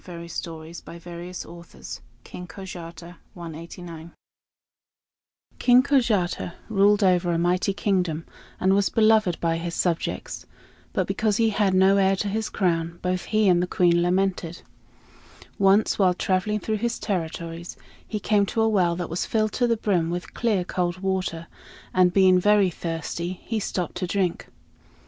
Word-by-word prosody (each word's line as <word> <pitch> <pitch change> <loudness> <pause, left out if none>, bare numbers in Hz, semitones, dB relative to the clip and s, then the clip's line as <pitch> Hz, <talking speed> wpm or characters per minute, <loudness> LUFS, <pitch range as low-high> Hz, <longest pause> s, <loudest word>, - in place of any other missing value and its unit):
RUSSIAN 170 -1 -8
STORIES 165 0 -7 1.4
KING 180 - -9
KOJATA 175 -1 -9 2.4
King 250 +1 +6
Kojata 220 -11 +1 0.2
ruled 205 0 +4
over 180 -2 +3
a 170 - +1
mighty 180 +3 +1
kingdom, 180 -5 -1 0.3
and 190 +1 +3
was 200 0 +2
beloved 215 -5 +3
by 165 -1 0
his 170 0 -4
subjects; 170 -3 -2 0.4
but - - 0
because 215 -3 0
he 225 -1 +3
had 200 -2 +1
no 190 +1 +5
heir 195 0 +3
to 200 +1 -2
his 220 +2 -2
crown, 170 -3 -1
both 180 0 -1
he 215 -1 +2
and 175 -2 +4
the 180 - -1
Queen 175 -1 +3
lamented. 180 -1 0 1.0
Once, 200 +3 +3
while 185 -2 +4
traveling 190 +4 0
through 215 +1 -2
his 235 +2 -2
territories, 170 -2 -4 0.3
he 215 - -3
came 205 -1 +2
to 225 - -1
a 225 - +3
well 180 -6 +2
that 175 -1 -4
was 170 +2 -3
filled 215 -1 +1
to 245 - +1
the 230 -1 +1
brim 180 -6 0
with 175 +1 -5
clear 215 -6 +1
cold 175 -1 -1
water; 185 -3 -2 0.5
and 180 -1 +4
being 185 -1 +5
very 205 -1 +4
thirsty, 170 +2 -4
he 225 -2 -2
stopped 180 -4 -3
to 180 - -2
drink. 185 -2 -1
185 Hz, 145 wpm, -24 LUFS, 175-205 Hz, 2.4 s, King